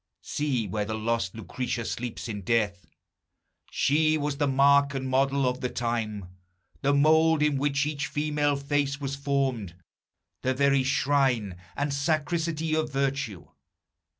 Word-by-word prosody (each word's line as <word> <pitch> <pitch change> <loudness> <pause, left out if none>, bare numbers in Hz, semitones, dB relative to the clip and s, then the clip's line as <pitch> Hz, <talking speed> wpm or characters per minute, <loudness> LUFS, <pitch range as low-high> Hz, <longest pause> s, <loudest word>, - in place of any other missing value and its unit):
See 135 -7 -1
where 105 +3 -2
the 110 +1 -3
lost 110 -3 -1
Lucretia 120 +1 -4
sleeps 120 +1 -4
in 105 -3 -5
death! 100 -4 0 0.8
She 155 +2 +2
was 145 -1 -2
the 145 -1 +1
mark 140 +1 +4
and 130 0 -3
model 135 +1 +2
of 125 +1 -2
the 125 - -1
time, 115 -5 -2 0.6
The 140 - +2
mould 155 +2 +4
in 150 -2 +2
which 145 0 +1
each 150 0 -2
female 150 -1 0
face 140 0 -1
was 140 -1 -3
formed, 135 -9 -1 0.7
The 130 0 0
very 140 0 +3
shrine 130 -6 +1 0.2
and 145 0 -1
sacristy 160 +2 -1
of 155 -2 -1
virtue! 135 -8 -2
140 Hz, 140 wpm, -27 LUFS, 120-145 Hz, 0.8 s, mark